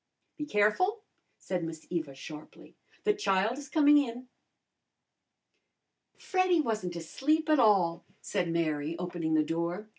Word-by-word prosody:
"Be 300 -2 -5
careful!" 335 - +1 0.3
said 180 -2 -3
Miss 165 -1 -7
Eva 160 -6 -3
sharply. 150 +3 -11 0.3
"The 420 - +3
child 230 - 0
is 285 -1 -10
coming 295 -1 +6
in." 250 -2 -4 1.9
"Freddy 370 -2 +1
wasn't 215 - -2
asleep 300 - 0
at 305 -2 +4
all," 185 -7 +3 0.2
said 175 - -2
Mary, 160 -1 -1
opening 170 -2 -2
the 155 - +4
door. 170 +6 -3
195 Hz, 125 wpm, -30 LUFS, -, 1.9 s, coming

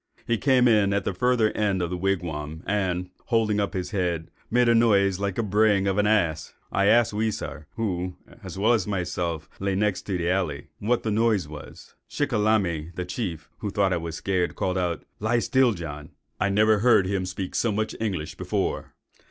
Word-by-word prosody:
He 115 - +1
came 130 -3 +4
in 105 -4 +4
at 100 - 0
the - - -2
further 115 +2 +2
end 100 -3 0
of 85 -1 -2
the - - -1
wigwam, 85 -4 -2
and, 90 -3 -1
holding 110 -3 +1
up 100 0 -1
his 90 +2 -3
head, 90 -5 -2 0.2
made 120 +1 +3
a 115 - +5
noise 100 -5 +3
like 100 -2 -1
the 115 - 0
braying 105 -1 +3
of 100 +1 +1
an 105 - +3
ass. 85 -8 +1 0.2
I 100 +1 +2
asked 115 0 +4
Weisar, 105 -9 -3
who, 90 -5 -2 0.3
as - - -7
well 110 +5 +3
as 105 -5 0
myself, 90 -4 -2
lay 100 0 -1
next 100 -1 0
the 90 -4 -1
alley, 85 -6 -1
what 115 +3 0
noise 110 -2 +2
that 75 - -13
was. 75 -2 -11 0.2
Shickalamy, 105 - 0
the 90 - -3
chief, 90 -5 -4
who 105 - -3
thought 95 -1 +1
I - - +1
was 85 -1 -5
scared, 90 -1 -1
called 95 - -1
out, 85 -3 -2
'Lie 110 +3 +1
still, 125 0 +3
John!' 75 -5 -7 0.3
I 100 - +2
never 105 +1 +4
heard 110 -4 +5
him 95 -1 -1
speak 90 +1 -5
so 115 - +1
much 110 +1 -2
English 95 -9 -2
before. - - -3
100 Hz, 195 wpm, -25 LUFS, 90-110 Hz, 0.3 s, a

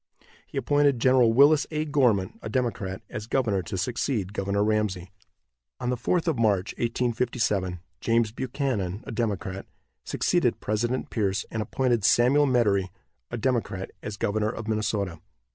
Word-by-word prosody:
He - - -8
appointed 145 +1 +3
Gen. 120 -2 +4
Willis 145 +3 +6
A. 155 -1 -2
Gorman, 125 -11 +1
a 110 - -5
Democrat, 110 -6 -2
as 105 +1 -6
governor 110 -7 +1
to 95 +1 -5
succeed 105 0 -1
Governor 100 0 0
Ramsey. 105 -4 -1 0.7
On 125 - -1
the - - +1
4th 170 +9 0
of 155 -7 +1
March, 105 -3 +1
1857, 115 -6 0 0.2
James 115 -1 +1
Buchanan, 120 -5 -2
a - - -6
Democrat, 100 -4 -3 0.4
succeeded - - +1
President 120 +4 -1
Pierce, 100 -2 0
and 110 - -2
appointed 120 -1 0
Samuel 135 +7 +4
Medary, 105 -7 +2 0.4
a 120 - -4
Democrat, 115 -6 -1
as 105 0 -6
governor 105 +1 0
of 115 -1 -6
Minnesota. 105 -5 -1
110 Hz, 145 wpm, -26 LUFS, 100-125 Hz, 0.7 s, Willis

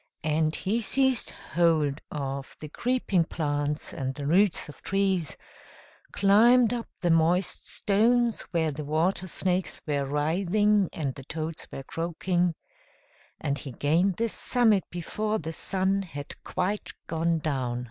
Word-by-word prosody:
And 155 +1 +1
he 220 +5 -1
seized 265 +2 +2
hold 155 -4 +1
of 140 -2 -5
the 155 - -7
creeping 235 - +1
plants, 145 -2 -2
and 130 0 -3
the 145 - -5
roots 185 +5 +3
of 150 - -12
trees 190 -5 0 0.7
climbed 230 +5 +5
up 235 -1 -3
the 175 - +2
moist 170 +3 +2
stones 230 +3 +2
where 160 -3 +1
the 150 +1 -5
water 165 +5 0
snakes 185 0 -1
were 145 -2 0
writhing 185 +8 +2
and 140 -5 -3
the 135 - -10
toads 160 +1 -5
were 135 - -6
croaking 175 +3 -1 0.8
and 140 0 -2
he 135 - -7
gained 170 +9 +2
the 230 - +1
summit 220 -4 +2
before 210 +5 -2
the 160 -2 -5
sun 190 +3 0
had 145 -6 -7
quite 200 +3 -2
gone 165 +1 0
down. 130 -6 -2
170 Hz, 135 wpm, -27 LUFS, 150-200 Hz, 0.8 s, climbed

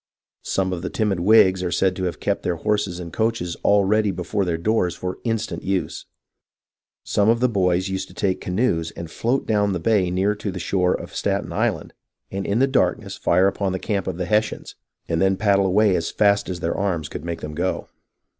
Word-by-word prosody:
Some 95 -1 -1
of 85 - -4
the 90 - -3
timid 105 -5 0
Whigs 95 -1 +5
are 90 - -1
said 95 +1 +1
to 95 - -2
have 90 - -3
kept - - -1
their 90 - -1
horses 100 -1 -1
and 85 -2 -8
coaches 110 -6 -1
all 100 0 +4
ready 105 +1 +2
before 95 +2 -2
their 85 -2 -1
doors 90 -1 0
for 90 +1 -5
instant 115 -2 -2
use. 95 -1 -3 1.0
Some 105 +1 +2
of 115 +1 +3
the 125 - +3
boys 95 -4 +1
used 95 0 -3
to - - -16
take 95 -3 -1
canoes 90 -4 0
and 85 -1 -7
float 125 +4 -1
down 105 -2 +1
the 90 - -2
bay 95 -1 +2
near 95 +3 +1
to 105 0 -5
the 95 - -5
shore 90 +1 +1
of - - -8
Staten - - -1
Island, - - -1 0.4
and 95 0 -3
in 100 - +1
the 130 - +4
darkness 135 0 0
fire 90 +2 +2
upon 100 -1 -1
the - - -1
camp 100 -1 -2
of - - -3
the 90 - -2
Hessians, 105 +2 -1 0.3
and 85 0 0
then 95 0 +3
paddle 100 -2 +3
away 100 +1 +3
as 85 - -1
fast 100 -1 +2
as 90 -1 -4
their 85 - -1
arms 90 -6 -1
could 75 - -7
make 85 -1 -4
them 75 0 -6
go. 90 +4 -2
95 Hz, 215 wpm, -22 LUFS, 90-105 Hz, 1.0 s, Whigs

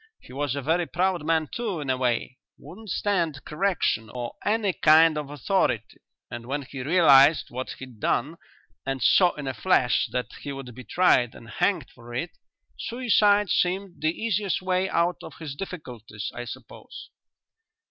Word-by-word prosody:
He - - -15
was 140 -1 -2
a 140 - -4
very 165 +4 +1
proud 180 -1 0
man 160 0 +1
too, 215 -8 -3
in 140 -3 -2
a - - +1
way 125 0 -1 0.2
wouldn't 215 +3 -12
stand 170 -7 -1
correction 155 - 0
or 120 +1 -5
any 210 -2 +1
kind 160 0 +5
of 150 -2 -4
authority, 145 - -1 0.3
and 120 0 -7
when 140 +2 -2
he 135 0 -8
realized 145 -1 +5
what 130 +2 -5
he'd 130 -4 -11
done 145 +10 0 0.5
and 135 -2 -3
saw 180 - +5
in 150 - -6
a 135 - -2
flash 125 -8 +2
that 125 - -3
he 140 - -5
would 135 -3 -8
be 130 +2 -10
tried 130 -10 +3
and - - -12
hanged - - 0
for 120 0 -11
it, 165 +7 -3 0.5
suicide 210 -4 +2
seemed 185 +1 0
the 155 - +2
easiest 205 +1 -1
way 185 0 0
out 170 +1 +1
of - - -10
his 155 -4 -6
difficulties, 125 - -7
I 120 - -6
suppose." - - -10
155 Hz, 170 wpm, -25 LUFS, 130-185 Hz, 0.5 s, kind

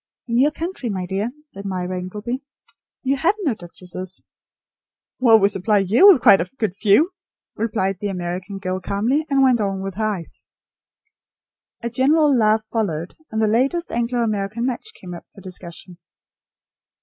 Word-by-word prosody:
"In 235 0 +1
your 285 +3 +5
country, 325 -5 -5
my 190 -3 -2
dear," 195 +5 -2 0.2
said 200 -8 -10
Myra 185 -1 -3
Ingleby, 210 +8 -5 0.6
"you 275 +1 +1
have 340 +9 +2
no 285 -8 +2
duchesses." 185 0 -8 1.0
"Well, 235 -3 +7
we 200 -2 +4
supply 200 +1 +1
you 205 - +5
with 370 -10 +7
quite 200 -7 +7
a 180 - -4
good 215 -7 -1
few," 215 - +3 0.4
replied 200 -4 -1
the 205 - -2
American 185 +1 -4
girl 185 -1 -3
calmly, 230 +12 0
and 275 -1 +3
went 250 -4 +4
on 195 -1 -2
with 195 0 -4
her 220 - -1
ice. 190 -6 -5 1.4
A 235 - -1
general 285 +3 +4
laugh 215 -2 +3
followed; 185 -7 -3
and 220 - -3
the 220 - +3
latest 270 +10 +1
Anglo 240 +1 0
American 215 +1 -2
match 255 - -3
came 180 -1 -9
up 170 - -10
for 195 - -12
discussion. 180 -1 -9
210 Hz, 160 wpm, -21 LUFS, 190-250 Hz, 1.4 s, Well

